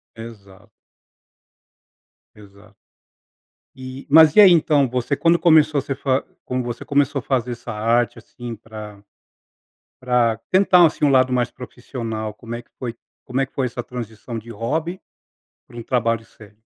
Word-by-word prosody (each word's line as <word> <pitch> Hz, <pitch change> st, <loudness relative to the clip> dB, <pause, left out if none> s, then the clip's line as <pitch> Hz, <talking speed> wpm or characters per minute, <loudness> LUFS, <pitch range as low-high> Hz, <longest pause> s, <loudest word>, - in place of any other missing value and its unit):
Exato. 110 Hz, -2 st, -13 dB, 1.7 s
Exato. 100 Hz, 0 st, -18 dB, 1.0 s
E 130 Hz, +1 st, -9 dB
mas 155 Hz, +1 st, +7 dB
e 210 Hz, -, +9 dB
aí, 195 Hz, -3 st, +8 dB
então 150 Hz, -5 st, +3 dB
você 125 Hz, +3 st, -2 dB
quando 165 Hz, +4 st, +2 dB
começou 155 Hz, -3 st, +4 dB
você 135 Hz, -, -4 dB
fa 135 Hz, 0 st, 0 dB, 0.2 s
quando 125 Hz, 0 st, -3 dB
você 120 Hz, -1 st, -6 dB
começou 140 Hz, 0 st, +1 dB
a -, -, -7 dB
fazer 125 Hz, -2 st, -1 dB
essa 120 Hz, -1 st, -7 dB
arte, 115 Hz, +3 st, 0 dB
assim, 120 Hz, -2 st, -9 dB
pra 105 Hz, -2 st, -11 dB, 1.0 s
pra 120 Hz, -3 st, +1 dB
tentar, 185 Hz, -2 st, +5 dB
assim, 150 Hz, -, -1 dB
um 145 Hz, -, +4 dB
lado 130 Hz, -1 st, +4 dB
mais 125 Hz, -1 st, 0 dB
profissional, 115 Hz, -4 st, -6 dB
como 115 Hz, +2 st, -9 dB
é 120 Hz, -, -6 dB
que -, -, -37 dB
foi 120 Hz, -3 st, -5 dB, 0.3 s
como 125 Hz, +2 st, -2 dB
é 135 Hz, -, +1 dB
que -, -, -34 dB
foi 135 Hz, -, 0 dB
essa 120 Hz, 0 st, -5 dB
transição 115 Hz, -1 st, -7 dB
de 115 Hz, +2 st, -11 dB
hobby 155 Hz, -, -3 dB, 0.7 s
para 120 Hz, -, -14 dB
um 120 Hz, -, -6 dB
trabalho 115 Hz, -2 st, 0 dB
sério? 105 Hz, -2 st, -18 dB
125 Hz, 160 wpm, -21 LUFS, 115-140 Hz, 1.7 s, e